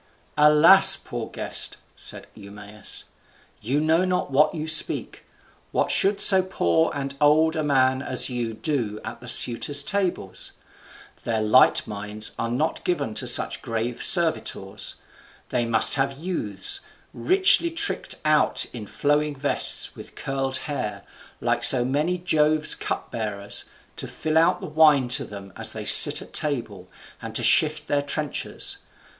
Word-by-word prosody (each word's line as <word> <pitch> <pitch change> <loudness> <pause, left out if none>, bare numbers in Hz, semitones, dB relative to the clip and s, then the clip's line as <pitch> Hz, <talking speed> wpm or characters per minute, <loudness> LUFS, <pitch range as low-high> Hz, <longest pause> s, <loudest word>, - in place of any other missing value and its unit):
"Alas! 160 +6 +6
poor 120 -2 -8
guest," - - -4 0.2
said - - -6
Eumaeus, 105 0 -10 0.6
"you 130 +7 -2
know 160 +3 0
not 180 -5 -3
what 150 +4 +1
you 155 0 -6
speak. 155 -1 +2 0.5
What - - -1
should 200 +1 +1
so 190 -1 +7
poor 85 - -1
and 140 -1 -6
old 155 +2 +2
a 155 - -3
man 130 -3 0
as 130 -2 0
you 120 -3 -5
do 115 -6 -4
at 115 +2 -9
the 125 - -13
suitors' 125 +4 +2
tables? 175 - -4 0.7
Their 115 -2 -3
light 110 +4 +3
minds 105 +1 -2
are 115 - -3
not 150 +7 -4
given 170 -11 -3
to - - -2
such - - +2
grave 115 +1 -5
servitors. 170 -3 +1 0.5
They 120 - -2
must 115 -1 +4
have 135 0 -3
youths, 125 - 0 0.3
richly 375 -2 +3
tricked 335 - -3
out 155 0 +1
in 110 -4 -9
flowing 145 +3 -2
vests, 140 +1 0
with - - -13
curled 135 -1 -4
hair, 105 -9 -6 0.4
like - - -2
so 125 -2 +6
many 150 +7 -2
of 175 - -12
Jove's 155 -1 +4
cupbearers, 105 -3 -4 0.3
to - - -7
fill 160 0 -2
out 165 - 0
the - - -7
wine 150 -4 +2
to 125 - -1
them 100 -2 -12
as - - +1
they - - -8
sit - - +8
at - - -19
table, 110 -11 -5 0.3
and - - -10
to - - -1
shift 155 -1 +1
their 145 0 -1
trenchers. 145 +1 -4
140 Hz, 150 wpm, -22 LUFS, 115-155 Hz, 0.7 s, sit